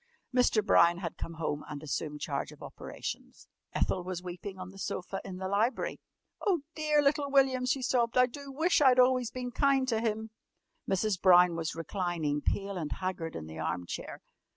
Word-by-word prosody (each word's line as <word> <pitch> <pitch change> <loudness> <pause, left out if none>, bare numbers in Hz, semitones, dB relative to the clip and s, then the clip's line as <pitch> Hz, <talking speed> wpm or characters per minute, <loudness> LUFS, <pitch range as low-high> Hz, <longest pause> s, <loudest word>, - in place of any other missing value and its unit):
Mr. 235 -4 +3
Brown 170 -2 +5
had 175 -3 -5
come 165 - -6
home 155 -2 -2
and 150 0 -6
assumed 150 0 -3
charge - - -2
of - - -13
operations. - - -7 0.2
Ethel 185 - 0
was 180 -1 -5
weeping 185 +2 -7
on 185 0 -7
the 195 - -13
sofa 195 0 -4
in 185 -2 -7
the 190 0 -3
library. 210 +6 0 0.4
"Oh, 370 -7 +2
dear 305 -2 +2
little 285 0 +2
William!" 265 -2 +3
she 265 0 +1
sobbed. 245 -2 +1
"I 250 - +7
do 275 +2 -9
wish 320 +4 +2
I'd 260 -3 +6
always 250 -1 +4
been 250 0 -5
kind 270 0 +2
to 225 -2 +1
him!" 220 -1 -2 0.6
Mrs. 195 0 +1
Brown 180 -2 +6
was 165 -1 -3
reclining, 165 -4 -2
pale 200 +3 -1
and 155 -4 -4
haggard, 185 -4 -4
in 80 - -5
the 80 +1 -9
arm 85 +2 -2
chair. - - -6
195 Hz, 185 wpm, -30 LUFS, 170-255 Hz, 0.6 s, I